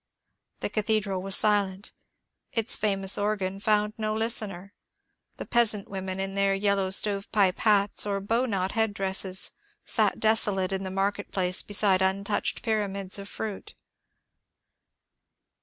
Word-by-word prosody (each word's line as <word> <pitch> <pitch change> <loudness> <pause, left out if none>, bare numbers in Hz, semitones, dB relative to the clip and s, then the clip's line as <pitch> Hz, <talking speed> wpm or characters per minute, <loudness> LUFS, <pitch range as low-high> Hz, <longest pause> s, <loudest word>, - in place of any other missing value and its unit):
The - - -2
cathedral 210 -3 -1
was 195 +1 0
silent; 205 -2 +1 0.6
its 225 +1 +2
famous 195 -2 +1
organ 200 -2 -2
found 210 0 +1
no 215 0 -1
listener; 210 -4 -1 0.6
the - - -7
peasant 220 -4 +2
women 190 -1 -5
in 195 0 -3
their 200 0 +1
yellow 195 -1 0
stove 200 +1 +1
pipe 195 -4 +2
hats 205 -2 +3
or 200 -1 -1
bow 230 +6 0
knot 190 -4 -1
headdresses 195 -4 +1 0.3
sat - - +1
desolate 210 -4 +1
in 190 0 -2
the 190 - -4
market 200 +2 -2
place 180 -1 +1
beside 200 -2 +1
untouched 195 +2 -1
pyramids 200 -4 -1
of 200 - -9
fruit. 215 -3 -7
200 Hz, 130 wpm, -26 LUFS, 195-215 Hz, 0.6 s, hats